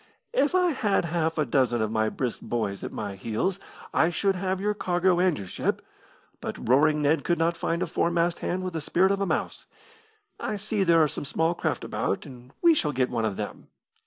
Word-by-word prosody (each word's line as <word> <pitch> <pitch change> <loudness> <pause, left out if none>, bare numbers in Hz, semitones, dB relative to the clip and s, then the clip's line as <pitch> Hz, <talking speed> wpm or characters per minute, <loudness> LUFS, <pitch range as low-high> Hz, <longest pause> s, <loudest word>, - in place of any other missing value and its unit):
"If 365 - +2
I 360 -1 +4
had 210 - +1
half 165 -1 -1
a 155 - +2
dozen 125 -2 +2
of 110 -1 0
my 110 -1 +1
brisk 125 0 -3
boys 105 -5 -3
at - - -4
my 105 -2 -4
heels 115 - -2 0.3
I 160 - +4
should 195 +3 +1
have 190 +1 -1
had - - -9
your 210 +2 0
cargo 180 -2 +1
and 180 -2 +3
your 100 - -6
ship, 90 - -2 0.5
but - - -6
Roaring 150 +4 +4
Ned 145 +1 +2
could 175 - +1
not 165 +1 +1
find 170 +1 -1
a - - 0
foremast 170 0 0
hand 185 +1 -2
with 185 -1 -4
the 160 - -3
spirit 185 +6 +2
of 200 0 0
a 200 - +1
mouse. - - -2 0.7
I 215 - -2
see 210 0 -1
there 165 -3 +5
are - - +3
some - - -5
small 160 +4 +1
craft - - -2
about, - - -2
and 125 -2 -12
we 340 -1 +7
shall 150 - 0
get 130 -1 0
one 115 - 0
of 105 -3 -1
them. - - -6
165 Hz, 220 wpm, -26 LUFS, 130-185 Hz, 0.7 s, we